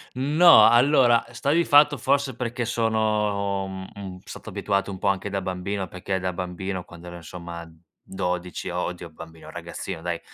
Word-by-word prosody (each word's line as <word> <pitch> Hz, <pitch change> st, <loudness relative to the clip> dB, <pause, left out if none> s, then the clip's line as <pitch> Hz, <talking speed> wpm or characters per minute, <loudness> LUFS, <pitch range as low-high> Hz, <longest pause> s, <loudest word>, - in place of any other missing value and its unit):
No, 150 Hz, +6 st, +7 dB
allora, 120 Hz, 0 st, +5 dB
eh, 115 Hz, +1 st, -17 dB
sta 140 Hz, +5 st, 0 dB
di 170 Hz, +2 st, +3 dB
fatto, 145 Hz, 0 st, +5 dB
forse, 140 Hz, +1 st, 0 dB
perché 120 Hz, 0 st, -3 dB
sono, 105 Hz, -4 st, 0 dB
mhmm, 95 Hz, 0 st, -8 dB
m -, -, -12 dB
stato -, -, -10 dB
abituato 100 Hz, -1 st, -1 dB
un 95 Hz, -, -6 dB
po' -, -, -3 dB
anche 100 Hz, +1 st, 0 dB
da 100 Hz, 0 st, -2 dB
bambino, 95 Hz, +1 st, -3 dB
perché 95 Hz, +2 st, -3 dB
da 95 Hz, 0 st, -2 dB
bambino, 90 Hz, +1 st, -4 dB
quando 85 Hz, 0 st, -13 dB
ero 85 Hz, -, -8 dB
insomma 85 Hz, 0 st, -8 dB, 0.4 s
12 90 Hz, -1 st, -4 dB
o 90 Hz, +1 st, -2 dB
oddio, 90 Hz, -1 st, -7 dB
bambino 80 Hz, +1 st, -12 dB
ragazzino -, -, -6 dB
dai, 85 Hz, -1 st, -3 dB
100 Hz, 175 wpm, -24 LUFS, 90-120 Hz, 0.4 s, No